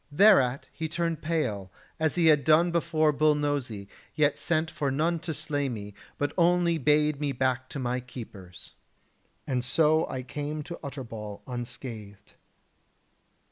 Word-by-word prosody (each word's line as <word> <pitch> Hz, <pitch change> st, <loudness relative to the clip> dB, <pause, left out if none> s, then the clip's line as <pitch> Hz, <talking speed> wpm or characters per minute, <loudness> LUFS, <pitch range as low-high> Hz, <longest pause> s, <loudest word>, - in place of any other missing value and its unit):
Thereat 145 Hz, -7 st, +5 dB
he 160 Hz, -, -3 dB
turned 165 Hz, -1 st, -2 dB
pale, 110 Hz, -, -2 dB, 0.3 s
as 160 Hz, -2 st, +1 dB
he 175 Hz, -2 st, +2 dB
had 150 Hz, -3 st, +5 dB
done 165 Hz, +3 st, +4 dB
before 165 Hz, -2 st, +2 dB
Bull 150 Hz, +1 st, +3 dB
Nosy, 140 Hz, -9 st, -2 dB, 0.3 s
yet 150 Hz, -1 st, +3 dB
sent 160 Hz, -1 st, 0 dB
for 140 Hz, -, -1 dB
none 160 Hz, +5 st, 0 dB
to 165 Hz, 0 st, -5 dB
slay 145 Hz, -2 st, -2 dB
me, 105 Hz, -4 st, -6 dB, 0.2 s
but 145 Hz, -, -1 dB
only 170 Hz, -1 st, +3 dB
bade 150 Hz, -1 st, +3 dB
me 145 Hz, -2 st, 0 dB
back 130 Hz, 0 st, -1 dB
to -, -, -6 dB
my 125 Hz, -1 st, -1 dB
keepers. 110 Hz, -8 st, -11 dB, 0.7 s
And 125 Hz, -3 st, -1 dB
so 155 Hz, +4 st, +3 dB
I 130 Hz, -, -4 dB
came 145 Hz, +3 st, -4 dB
to 170 Hz, +3 st, -8 dB
Utterbol 115 Hz, -7 st, -7 dB
unscathed." 120 Hz, -4 st, -7 dB
145 Hz, 145 wpm, -28 LUFS, 125-160 Hz, 0.7 s, Thereat